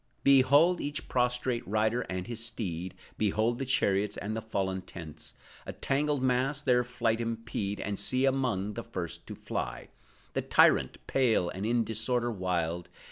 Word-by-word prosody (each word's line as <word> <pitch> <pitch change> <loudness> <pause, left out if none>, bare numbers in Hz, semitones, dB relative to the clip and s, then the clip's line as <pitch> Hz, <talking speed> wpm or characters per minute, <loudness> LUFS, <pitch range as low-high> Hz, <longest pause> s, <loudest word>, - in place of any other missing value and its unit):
Behold 140 +6 +5
each 145 +1 -4
prostrate 125 -1 0
rider 110 +4 +1
and 90 0 -3
his 115 -1 -3
steed; 95 -6 -4 0.2
Behold 110 +3 +1
the 135 - -3
chariots, 105 -6 +2
and 105 +2 -3
the 110 - -3
fallen 95 -4 -2
tents, 80 -5 -9 0.3
A - - -4
tangled 145 0 0
mass 130 +3 +2
their 125 -4 +3
flight 120 -2 0
impede; 115 -3 -3
And 100 0 -3
see, 130 +1 +1
among 125 -7 0
the 115 - -5
first 90 -7 -6
to - - -6
fly, - - -4 0.4
The - - 0
tyrant, - - +4
pale, 115 -9 +2
and 95 +4 -4
in 120 0 +2
disorder 115 +3 0
wild! 90 -4 -2
115 Hz, 155 wpm, -30 LUFS, 100-125 Hz, 0.4 s, Behold